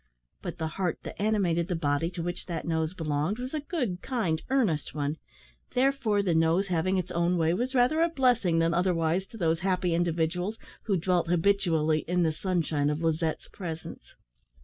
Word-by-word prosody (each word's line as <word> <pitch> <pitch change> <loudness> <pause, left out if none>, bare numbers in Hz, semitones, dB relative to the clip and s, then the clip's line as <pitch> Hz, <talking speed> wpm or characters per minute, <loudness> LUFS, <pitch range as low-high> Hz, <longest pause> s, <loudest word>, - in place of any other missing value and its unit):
But - - -5
the 160 - -2 0.2
heart 175 -4 0
that - - -7
animated 185 -6 +1
the 180 - -1
body 150 0 0
to 175 -2 -5
which 175 0 -4
that 170 -3 -4
nose 160 +1 -1
belonged, 155 +4 -1
was 255 +3 -5
a 310 - 0
good, 255 - -3
kind, 205 -12 -1
earnest 200 - +1
one; 145 +1 -1 0.6
therefore, 250 -6 +2
the 180 -4 +1
nose 165 +4 +2
having 185 +2 +1
its 180 0 -2
own 175 +1 +1
way 165 0 +2
was 250 +8 -2
rather 255 +6 +3
a 335 - +4
blessing 245 - +2
than 165 0 +2
otherwise 175 0 +1
to 230 - -11
those 165 -4 +1
happy 180 -1 0
individuals 175 +4 0 0.3
who 200 -4 +2
dwelt 175 0 +1
habitually 165 -3 +2
in 180 +1 +2
the 160 - +2
sunshine 155 -4 0
of 150 +2 -2
Lizette's 160 0 0
presence. 165 -4 -8
175 Hz, 180 wpm, -28 LUFS, 160-200 Hz, 0.6 s, a